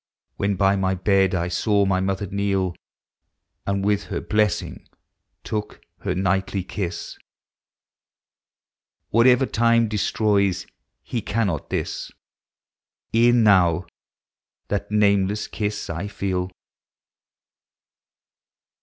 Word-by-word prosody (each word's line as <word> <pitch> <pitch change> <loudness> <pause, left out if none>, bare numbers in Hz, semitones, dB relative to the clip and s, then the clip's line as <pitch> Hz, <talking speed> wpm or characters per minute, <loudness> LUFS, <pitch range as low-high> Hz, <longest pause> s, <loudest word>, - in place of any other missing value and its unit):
When 100 0 0
by 95 +1 +3
my 95 -1 0
beri 95 0 +2
I 85 0 0
saw 100 +3 +1
my 95 -1 +1
mother 95 +1 -1
kneel. 95 -2 -1 0.9
Ami 100 0 0
with 105 0 +1
her - - -3
blessing 105 -1 -1 0.6
took 105 -1 -4 0.2
her - - -2
nightly 95 +1 0
kiss; 95 -1 -5 1.9
Whatever 125 +3 +5
time 115 -1 +3
destroys, 100 -2 +1 0.5
lie 120 - +1
cannot 100 -8 -1
this; - - -3 1.0
E'en 120 +1 +5
now 90 -4 +4 0.8
that 100 - -2
nameless 100 -1 +2
kiss 105 -1 -3
I 85 +5 -4
feel. 95 -2 -2
100 Hz, 95 wpm, -23 LUFS, 95-105 Hz, 1.9 s, Whatever